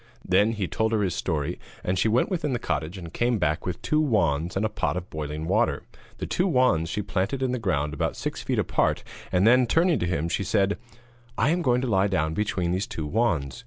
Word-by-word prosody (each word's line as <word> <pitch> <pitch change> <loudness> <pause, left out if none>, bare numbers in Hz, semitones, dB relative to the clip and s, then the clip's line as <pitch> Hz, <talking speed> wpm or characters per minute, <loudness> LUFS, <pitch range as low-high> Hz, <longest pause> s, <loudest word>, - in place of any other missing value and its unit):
Then 100 +5 +3
he 105 -4 -2
told 110 +8 0
her 105 -2 +2
his 95 - 0
story, 80 0 -2 0.2
and 90 0 0
she 110 - +3
went 115 - +2
within 155 -7 -1
the - - +1
cottage 80 -3 -3
and 85 -2 -9
came 120 0 +1
back 75 -3 0
with 90 - -3
two 155 0 +2
wands, 85 - +1
and 100 - +1
a - - +3
pot 105 -4 -2
of 90 0 -6
boiling 75 0 -4
water. - - +1 0.3
The - - -4
two 185 - 0
wands 125 - +2
she 105 - -2
planted 100 +7 -1
in 130 - +1
the 125 - -1
ground 75 -8 -1
about 75 - -1
six - - -4
feet - - -1
apart, - - +1 0.3
and 90 +2 +3
then, 125 +2 +5
turning 165 +5 +3
to 90 - -1
him, 85 -2 -1
she 90 - -1
said: 100 +1 +1 0.6
'I 120 - +3
am 175 +1 +1
going 125 -5 +2
to 130 - -1
lie 100 -3 +3
down 80 -5 0
between 95 -3 -1
these 95 +4 -1
two 80 - -5
wands. 85 - 0
95 Hz, 235 wpm, -26 LUFS, 85-120 Hz, 0.6 s, then